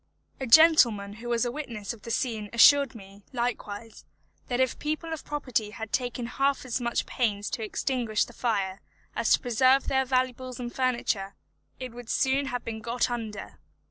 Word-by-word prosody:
A 265 - -3
gentleman 230 -8 +6
who 240 - -6
was 235 0 +1
a 240 - -1
witness 235 -7 -5
of 225 - -14
the 230 - -9
scene 220 -3 -2
assured 275 +2 +6
me, 200 -1 -13
likewise, 230 -3 -4 0.4
that 245 0 -1
if 260 -2 +3
the - - -11
people 310 +2 -3
of 320 - -6
property 255 -7 -2
had 220 0 -8
taken 245 -1 -1
half 275 +2 0
as 250 0 -2
much 235 0 -1
pains 205 -4 -1
to 230 - -3
extinguish 230 -1 -1
the 240 - -14
fire 200 -6 -1 0.3
as - - 0
to - - +4
preserve 255 +3 +3
their 265 0 +2
valuables 255 -1 -1
and 240 -1 -5
furniture, 235 -6 -1 0.4
it 255 -2 -6
would 240 -1 -11
soon 270 +1 +1
have 245 -2 -4
been 225 -1 -4
got 235 +2 -1
under. 225 -3 -6
240 Hz, 180 wpm, -27 LUFS, 220-260 Hz, 0.4 s, gentleman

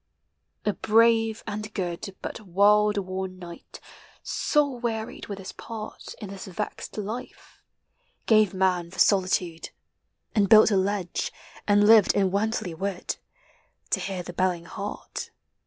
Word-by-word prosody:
A 210 - +2
brave 225 +1 +3
and 215 0 -5
good, 185 +1 -4
But - - -5
world 210 +2 +4
worn 185 -1 -3
knight 175 -2 -11 0.3
— - - -27
soul 285 -5 +1
wearied 225 -2 -4
with 200 - -5
his 190 -1 -7
part 220 -2 -8
In 210 -4 -7
this 195 -1 -8
vexed 195 +4 -5
life 220 +5 -7 0.3
— - - -48 0.3
gave 215 -4 +5
man 185 -3 +1
for 185 - -13
solitude, 185 -4 +2 0.6
And 205 -4 +2
built 220 0 +8
a - - +3
lodge, 190 -2 -1 0.4
and 205 0 +5
lived 220 -2 +7
in 195 -2 +2
Wantley 205 -2 -1
wood, 190 +2 -3 0.7
To - - +2
hear 190 -2 -4
the 175 - -8
belling 175 -1 0
hart. 200 +2 -6
200 Hz, 140 wpm, -26 LUFS, 185-215 Hz, 0.7 s, built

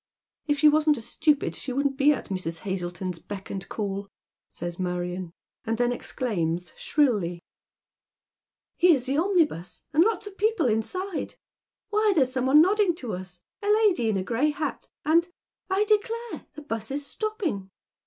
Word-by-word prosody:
" - - -52
If 290 -1 +2
she 300 - +6
wasn't 300 0 +4
a - - -5
stupid, 285 +5 +1
she 260 - -5
wouldn't 275 +1 0
be 280 +2 +5
at 290 - -3
Mrs. 170 -4 -3
Hazleton's 180 -2 -4
beck 195 +2 -8
and 195 -1 -5
call," 200 -2 -3 0.4
says 175 0 -6
Marion, 180 -1 -3 0.3
and 225 -2 -1
then 245 0 +2
exclaims, 180 -9 -2
shrilly, 205 - +1 0.7
" - - -65
Here's 325 -8 +5
the 275 +3 +1
omnibus, 320 - +1
and 315 +3 +6
lots 445 +1 0
of 405 -1 -10
people 430 -6 +2
inside. 320 - -1 0.6
Why, 425 0 +3
there's 260 -5 +3
some 255 0 0
one 295 +4 +8
nodding 395 -1 +3
to 245 - -5
us 180 -1 -8
— - - -64
a 410 - -4
lady 410 - +3
in 210 - +1
a 185 - -1
gray 240 +9 +1
hat 300 +1 -3
— - - -43
and 335 +3 +4 0.2
— - - -66
I 385 +2 +3
declare, 450 +2 -1
the 300 - -9
'bus 225 -5 -4
is 280 +1 -3
stopping. 360 - -3
265 Hz, 175 wpm, -26 LUFS, -, 0.7 s, one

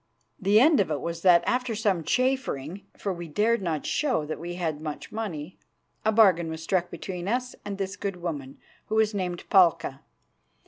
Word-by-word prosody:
The 205 +1 +4
end 300 +4 +5
of 195 - +2
it 150 -2 -1
was 170 +3 -4
that 175 -2 +6
after 250 -2 0
some 200 -6 +1
chaffering, 200 - -1
for 195 - -2
we 175 -1 -7
dared 215 +8 +1
not 160 -5 -2
show 255 - 0
that 155 - -5
we 175 +2 -5
had 160 -4 -2
much 155 -2 -6
money, 185 -7 -5 0.4
a 220 - +3
bargain 190 -7 +4
was 160 0 -6
struck 180 0 0
between 180 -1 -6
us 250 +3 -1
and 205 -1 -5
this 195 0 -3
good 200 -2 -3
woman, 150 -7 -5 0.3
who 215 - -2
was 220 -1 +3
named 180 -3 -3
Palka. 170 -7 +4
185 Hz, 185 wpm, -26 LUFS, 165-215 Hz, 0.4 s, that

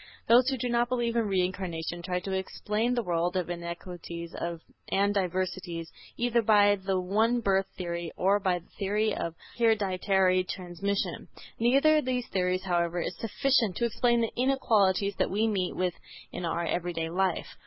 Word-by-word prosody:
Those 245 +3 +6
who 265 - -1
do 245 - -2
not 240 0 +1
believe 240 -2 0
in 230 -2 +1
Reincarnation 180 -3 -2
try 180 +1 -2
to 195 - -5
explain 210 +5 -1
the 240 - 0
world 175 0 0
of 175 -1 -2
inequalities 170 0 -7 0.6
and 200 +1 +2
diversities 185 -3 -2 0.3
either 240 0 +2
by 205 -2 +5
the 190 -1 -1
one 220 +6 +2
birth 195 -3 +1
theory 170 -2 -4
or 195 +3 +3
by 185 -3 +1
the 170 - -14
theory 210 +2 +1
of 165 -1 -4 0.2
hereditary 190 -4 +3
transmission. 185 +2 -3 0.3
Neither 275 +7 +4
of 300 - 0
these 250 -1 -1
theories, 185 -1 0
however, 175 -1 0
is 175 - -3
sufficient 230 -3 +1
to 235 - +1
explain 235 +1 +2
the 230 - -1
inequalities 210 -7 +2
that - - +2
we 215 +4 +1
meet 190 -4 -1
with 180 -1 0 0.4
in 180 - -5
our 170 +1 -1
everyday 165 -1 -2
life. 185 0 -1
190 Hz, 165 wpm, -28 LUFS, 180-225 Hz, 0.6 s, Those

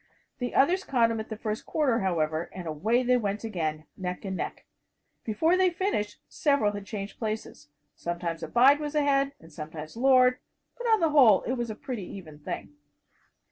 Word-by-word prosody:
The 245 -1 -3
others 360 +8 +4
caught 235 -7 +2
him 225 - -2
at 220 - -6
the 220 - -5
first 215 -1 -4
quarter, 270 -7 +1
however, 160 -3 0
and 185 -2 -7
away 215 +11 +1
they 250 0 +3
went 210 -2 -2
again, 160 -8 -3
neck 180 +1 -5
and 190 -1 -3
neck. - - -5 0.6
Before 320 +11 +2
they 370 0 +4
finished, 335 - -2
several 280 - +2
had 205 -1 -7
changed 200 -2 -6
places. 215 -8 -4 0.3
Sometimes 170 -1 -4
"Abide" 265 - +5
was 300 0 -4
ahead, 280 -1 +2
and 160 -1 -16
sometimes 155 +2 -8
"Lord," 255 0 +5 0.4
but 485 -1 -4
on 445 -3 +4
the 325 -2 +3
whole 250 -10 +6
it 250 - -1
was 240 -2 -2
a 215 - -4
pretty 230 -4 -5
even 155 -6 -10
thing. 150 - -6
220 Hz, 180 wpm, -28 LUFS, 185-275 Hz, 0.6 s, whole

